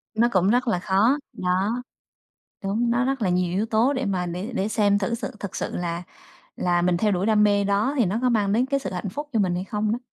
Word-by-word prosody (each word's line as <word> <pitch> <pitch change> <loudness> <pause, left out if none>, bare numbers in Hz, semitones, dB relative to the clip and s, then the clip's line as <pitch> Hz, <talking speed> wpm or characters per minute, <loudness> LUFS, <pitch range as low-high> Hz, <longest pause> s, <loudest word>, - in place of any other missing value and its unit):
Nó 230 +2 +4
cũng 185 -1 +3
rất 245 +3 +2
là 220 -6 +1
khó, 200 +9 +2 0.2
đó, 190 +7 -1 0.8
đúng, 220 +5 0
nó 240 +2 +2
rất 265 -1 -1
là 195 - +2
nhiều 180 -1 +1
yếu 200 +4 0
tố 225 +4 +2
để 265 -1 -2
mà 185 -4 -1
để 180 +7 -5
để 195 - 0
xem 205 -2 +2
thử 205 +4 -1
sự 230 - -4
thực 200 - -5
sự - - -3
là 170 -1 -3 0.5
là 175 -1 +1
mình 175 0 +2
theo 210 +3 +1
đuổi 185 0 0
đam 215 -1 +4
mê 205 -1 +3
đó 200 +7 +1
thì 240 - +3
nó 200 +5 -1
có 255 - +2
mang 205 -4 +1
đến 245 +4 +2
cái 275 +1 0
sự - - -5
hạnh 185 +2 -3
phúc 290 +9 -6
cho 225 - +2
mình 185 -3 +1
hay 180 - -2
không 210 +1 -2
đó. 235 - -1
205 Hz, 260 wpm, -24 LUFS, 185-235 Hz, 0.8 s, Nó